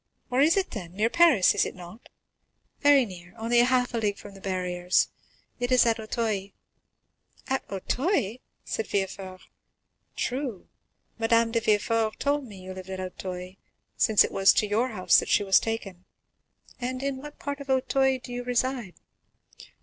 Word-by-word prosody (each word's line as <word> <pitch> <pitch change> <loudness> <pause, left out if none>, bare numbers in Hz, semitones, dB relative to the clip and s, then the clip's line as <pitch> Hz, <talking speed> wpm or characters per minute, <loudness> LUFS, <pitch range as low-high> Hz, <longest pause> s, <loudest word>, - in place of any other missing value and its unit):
"Where 255 +2 +2
is 320 +6 +4
it, 385 - 0
then? 180 -6 -7
Near 215 +4 0
Paris, 325 - +5
is - - +2
it - - -4
not?" 180 +5 -12 0.7
"Very 285 -3 +5
near, 180 -3 -12
only 230 +2 +2
half 250 0 +2
a 230 - 0
league 205 -2 -1
from 205 - -11
the 195 - -14
Barriers,—it 185 +6 -2
is 255 -1 +5
at 230 -1 +2
Auteuil." 215 -3 -2 0.9
"At 265 - -1
Auteuil?" 235 - -1 0.3
said 220 - -3
Villefort; 190 -1 -3 0.7
"true, 255 -6 -3 0.5
Madame 230 0 +3
de 230 - +2
Villefort 220 0 +1
told 285 0 0
me 195 -4 -11
you 185 0 -7
lived 185 0 -9
at 190 0 -5
Auteuil, 185 0 -6 0.4
since 215 -2 +5
it - - -3
was 195 0 +5
to - - +2
your 215 +4 +1
house 195 -6 +4
that - - -5
she - - +3
was 195 -1 +5
taken. 195 -5 -5 0.7
And 255 +1 -3
in 275 -1 -2
what 295 +2 -10
part 285 0 -5
of 280 -1 -10
Auteuil 265 0 +2
do 245 - -8
you 245 0 -4
reside?" 245 -4 -1
225 Hz, 165 wpm, -27 LUFS, 190-255 Hz, 0.9 s, Paris